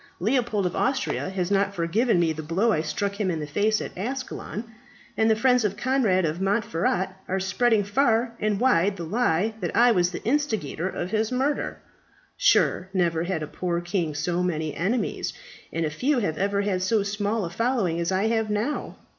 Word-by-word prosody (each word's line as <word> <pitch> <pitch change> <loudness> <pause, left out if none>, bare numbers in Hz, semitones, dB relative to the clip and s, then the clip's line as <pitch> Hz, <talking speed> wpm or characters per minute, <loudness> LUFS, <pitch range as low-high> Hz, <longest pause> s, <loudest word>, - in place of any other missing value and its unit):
Leopold 220 -1 +1
of 180 - -1
Austria 260 -7 0
has 190 -1 -2
not 200 0 +1
forgiven 190 +5 +2
me 165 -2 +2
the 155 - -6
blow 180 +9 +1
I 155 - +1
struck 200 +6 -3
him 195 - +1
in 165 -3 -1
the 150 - -3
face 205 +9 +1
at - - -6
Ascalon, 240 0 -4 0.5
and 220 0 +3
the 220 - +4
friends 250 +1 +3
of 205 -1 -1
Conrad 225 -7 +2
of 160 +3 -2
Montferat 190 -2 0 0.2
are 190 +1 -1
spreading 205 +3 +2
far 230 +2 +2
and 210 -2 0
wide 205 -6 +3
the 170 - -5
lie 210 +1 +1
that 175 -4 -3
I 240 +1 +6
was 180 -5 +3
the 180 - -7
instigator 220 - -1
of 180 0 -4
his 220 +1 0
murder. 270 +3 -1 0.6
Sure - - +3
never 170 -2 +1
had 175 -4 -2
a - - -4
poor 175 +1 -2
king 175 -3 -2
so 170 +4 -1
many 160 -4 -1
enemies, 215 +8 -1 0.4
and 165 0 -1
few 270 - +1
have 180 -10 -1
ever 200 +1 +1
had 190 -3 0
so 205 +2 +2
small 205 +1 -1
a 170 - -6
following 225 -5 0
as 170 +2 -1
I 190 +1 +1
have 225 -1 0
now. 210 +8 -2
200 Hz, 190 wpm, -25 LUFS, 175-225 Hz, 0.6 s, I